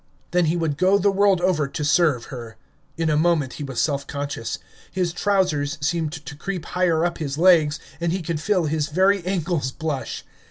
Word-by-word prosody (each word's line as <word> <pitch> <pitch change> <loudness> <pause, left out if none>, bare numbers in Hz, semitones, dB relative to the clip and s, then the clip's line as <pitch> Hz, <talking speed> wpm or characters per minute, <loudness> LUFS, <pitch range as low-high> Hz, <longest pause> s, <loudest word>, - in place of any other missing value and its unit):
Then 180 -1 +3
he 160 +2 +1
would 160 -4 -1
go 190 +2 +4
the 200 +1 +2
world 195 -2 +3
over 175 -6 +2
to 150 +2 -4
serve 150 -6 +3
her. 115 -3 -8 0.4
In 165 -1 0
a - - +2
moment 155 -4 +2
he - - -2
was 135 -3 -4
self 140 -2 0
conscious. 140 -5 -4 0.3
His 180 -2 -1
trousers 170 -7 +1
seemed 155 +1 -1
to 150 -2 -8
creep 180 +2 -5
higher 175 -2 +1
up 175 - -2
his 145 -3 -3
legs, 160 -3 +4 0.2
and 170 -1 0
he 185 0 -2
could 160 -2 -3
feel 185 -1 +1
his 155 0 0
very 190 +4 +2
ankles 170 -7 -1
blush. 145 -5 -4
160 Hz, 195 wpm, -23 LUFS, 145-180 Hz, 0.4 s, go